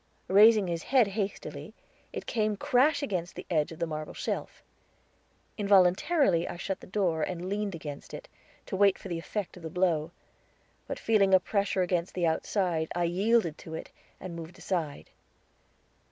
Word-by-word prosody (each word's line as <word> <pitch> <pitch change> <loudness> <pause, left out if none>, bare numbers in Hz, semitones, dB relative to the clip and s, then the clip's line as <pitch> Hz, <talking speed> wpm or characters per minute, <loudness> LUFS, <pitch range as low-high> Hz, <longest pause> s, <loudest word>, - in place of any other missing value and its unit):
Raising 210 +2 +7
his 170 -2 -2
head 250 -2 +3
hastily, 200 0 -5 0.4
it - - -6
came 215 -2 0
crash 285 +7 +3
against 180 -9 -3
the - - -7
edge 155 -2 +1
of 165 - -9
the 170 - -1
marble 155 -1 -6
shelf. - - -4 1.0
Involuntarily 195 - +4
I - - -6
shut 190 +2 -3
the - - -13
door, 185 -5 0
and 180 +2 -3
leaned 200 -1 -2
against 150 -3 -8
it, - - -8 0.4
to - - -4
wait 200 0 +4
for 195 - -9
the 170 -1 -2
effect 190 +2 -5
of - - -12
the 160 - -6
blow; 165 -3 +1 0.8
but - - -4
feeling 200 -4 +4
a - - +6
pressure 200 -1 0
against 175 -1 -1
the 180 -2 +1
outside, 165 0 0
I 175 - +1
yielded 185 0 +1
to 160 - -8
it, - - -7 0.3
and 180 -2 -7
moved 170 +2 -9
aside. 170 -6 -3
185 Hz, 170 wpm, -29 LUFS, 170-205 Hz, 1.0 s, Raising